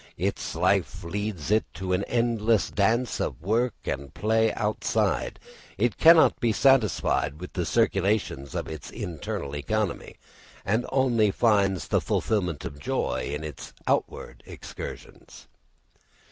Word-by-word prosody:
Its -, -, -2 dB
life -, -, +1 dB
leads 100 Hz, -1 st, -4 dB
it 110 Hz, +1 st, +4 dB
to 95 Hz, 0 st, -2 dB
an 90 Hz, +2 st, +1 dB
endless 115 Hz, -2 st, +1 dB
dance 115 Hz, +4 st, +1 dB
of -, -, -2 dB
work 115 Hz, +8 st, 0 dB
and 70 Hz, +1 st, -4 dB
play 110 Hz, +5 st, +2 dB
outside; 105 Hz, -1 st, -1 dB, 0.4 s
it 115 Hz, +3 st, 0 dB
cannot 165 Hz, 0 st, +7 dB
be 120 Hz, -, +2 dB
satisfied 110 Hz, -, +2 dB
with 90 Hz, -, -8 dB
the 90 Hz, -3 st, -2 dB
circulations 100 Hz, -, 0 dB
of -, -, -3 dB
its 80 Hz, -3 st, -7 dB
internal 75 Hz, -3 st, -5 dB
economy, 100 Hz, +6 st, -2 dB, 0.5 s
and 110 Hz, +5 st, 0 dB
only 125 Hz, -5 st, +3 dB
finds 100 Hz, -4 st, +2 dB
the -, -, +2 dB
fulfilment 90 Hz, -, -1 dB
of 70 Hz, -, -7 dB
joy 65 Hz, -2 st, -2 dB
in 75 Hz, +2 st, -4 dB
its 75 Hz, -4 st, -8 dB
outward -, -, -2 dB
excursions. -, -, -10 dB
105 Hz, 130 wpm, -26 LUFS, 85-115 Hz, 0.5 s, cannot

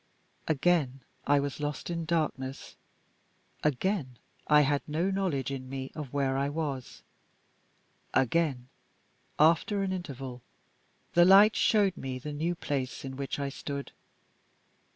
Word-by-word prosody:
Again, 145 Hz, -4 st, +1 dB, 0.3 s
I 145 Hz, 0 st, +5 dB
was 140 Hz, 0 st, -3 dB
lost 150 Hz, +3 st, -3 dB
in 165 Hz, -1 st, -3 dB
darkness. 150 Hz, -5 st, -2 dB, 0.9 s
Again, 150 Hz, -2 st, 0 dB, 0.3 s
I 150 Hz, 0 st, +6 dB
had 145 Hz, 0 st, +2 dB
no 165 Hz, +6 st, 0 dB
knowledge 170 Hz, -10 st, -1 dB
in 130 Hz, -1 st, -5 dB
me 135 Hz, 0 st, -5 dB
of 150 Hz, -5 st, -6 dB
where 135 Hz, -2 st, 0 dB
I 140 Hz, +1 st, 0 dB
was. 145 Hz, -4 st, -4 dB, 1.1 s
Again, 130 Hz, -1 st, +1 dB, 0.7 s
after 170 Hz, +6 st, +3 dB
an 190 Hz, -1 st, -1 dB
interval, 135 Hz, -8 st, -6 dB, 0.7 s
the 175 Hz, -, +7 dB
light 200 Hz, +4 st, +7 dB
showed 200 Hz, -4 st, +3 dB
me 130 Hz, -1 st, -4 dB
the 150 Hz, +4 st, -6 dB
new 165 Hz, +4 st, -1 dB
place 135 Hz, -5 st, -3 dB
in 135 Hz, 0 st, -6 dB
which 140 Hz, 0 st, -4 dB
I 140 Hz, -1 st, -2 dB
stood. 140 Hz, 0 st, -6 dB
145 Hz, 130 wpm, -29 LUFS, 135-170 Hz, 1.1 s, the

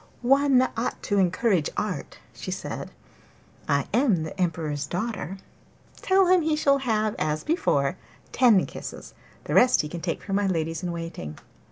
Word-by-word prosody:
'One 270 Hz, 0 st, +4 dB
ought 230 Hz, +2 st, -3 dB
to 205 Hz, -1 st, +1 dB
encourage 185 Hz, -2 st, +2 dB
art,' 185 Hz, -9 st, -3 dB, 0.2 s
she -, -, -7 dB
said. -, -, -5 dB, 0.8 s
'I 140 Hz, -1 st, +2 dB
am 225 Hz, -, +3 dB
the 170 Hz, +4 st, -5 dB
Emperor's 155 Hz, -4 st, -1 dB
daughter! 195 Hz, 0 st, -4 dB, 0.6 s
Tell 385 Hz, 0 st, +3 dB
him 365 Hz, 0 st, +4 dB
he 315 Hz, -1 st, +1 dB
shall 280 Hz, -2 st, +3 dB
have, 215 Hz, -4 st, 0 dB
as 155 Hz, 0 st, -1 dB
before, 160 Hz, -, +1 dB, 0.3 s
ten 235 Hz, -7 st, +5 dB
kisses; -, -, -9 dB, 0.3 s
the -, -, -4 dB
rest 250 Hz, 0 st, +5 dB
he 150 Hz, -, -5 dB
can 170 Hz, +2 st, -6 dB
take 170 Hz, -1 st, -3 dB
from 195 Hz, -1 st, -1 dB
my 205 Hz, -1 st, +1 dB
ladies 165 Hz, -3 st, -1 dB
in 180 Hz, -1 st, -3 dB
waiting. 165 Hz, -, -6 dB
195 Hz, 160 wpm, -25 LUFS, 165-250 Hz, 0.8 s, ten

